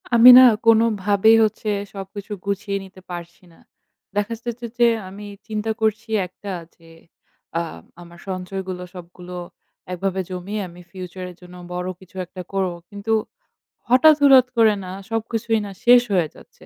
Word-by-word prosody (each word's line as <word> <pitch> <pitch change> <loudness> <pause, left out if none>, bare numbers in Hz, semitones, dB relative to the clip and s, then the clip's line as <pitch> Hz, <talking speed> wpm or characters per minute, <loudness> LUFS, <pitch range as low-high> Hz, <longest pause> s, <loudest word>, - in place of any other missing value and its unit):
আমি 235 +2 +9
না - - +11 0.3
কোনোভাবেই 220 -1 +4
হচ্ছে 215 0 -1 0.2
সবকিছু 200 +2 -8
গুছিয়ে 200 0 -2
নিতে 190 0 -15
পারছি 175 +1 -8
না। - - -22 0.6
দেখা 205 +2 -1
যাচ্ছে 240 0 -5
যে 240 - +6 0.2
আমি 205 +2 -10 0.2
চিন্তা 215 0 -2
করছি 220 +1 0 0.2
একটা 195 +2 -9 0.2
যে, 165 -1 -20 0.7
আ - - 0 0.4
আমার 170 0 -14
সঞ্চয়গুলো 185 0 -5
সবগুলো 180 0 -10 0.6
একভাবে 190 +1 -2
জমিয়ে 185 +3 -4
আমি 175 +1 -14
future 185 -1 -7
এর - - -16
জন্য 180 0 -13 0.2
বড় 180 0 -3
কিছু 190 -1 -19
একটা 185 +1 -9
করব। 190 -2 0 0.2
কিন্তু 205 +2 -3 0.8
হঠাৎ, 280 +5 +7
হঠাৎ 265 -3 +7
করে 220 -2 +5
না 180 - -7 0.2
সবকিছুই 225 0 -1
না 200 - -7
শেষ 245 0 +8
হয়ে 175 -5 +2
যাচ্ছে। - - -18
200 Hz, 150 wpm, -22 LUFS, 180-225 Hz, 0.8 s, না